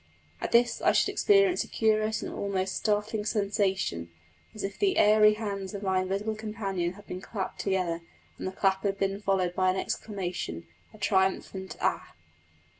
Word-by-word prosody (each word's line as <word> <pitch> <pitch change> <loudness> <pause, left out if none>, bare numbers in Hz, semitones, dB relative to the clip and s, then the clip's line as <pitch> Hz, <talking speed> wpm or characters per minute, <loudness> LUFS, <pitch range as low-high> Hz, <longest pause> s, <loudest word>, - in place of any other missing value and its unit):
At - - -3
this 240 +1 +3
I - - +4
should - - +3
experience 395 -3 +4
a - - -11
curious 215 -1 +1
and - - -5
almost 190 -1 -2
startling 210 0 0
sensation, 200 - 0 0.5
as 215 - -6
if 195 0 -4
the 390 -2 +2
airy 210 0 +6
hands 200 -2 -4
of 200 - -6
my 190 -1 +2
invisible 200 +4 -2
companion 205 -5 -3
had 205 +2 -14
been 180 0 -6
clapped 195 -1 -5
together, 180 -4 0 0.4
and - - -3
the - - -2
clap 190 0 +1
had 200 -1 -1
been 195 +1 -1
followed 190 -3 +1
by 185 0 +2
an 185 - +1
exclamation 180 - -4 0.3
a 215 - -15
triumphant 190 -1 0
"Ah!" - - -1
195 Hz, 170 wpm, -28 LUFS, 190-215 Hz, 0.5 s, airy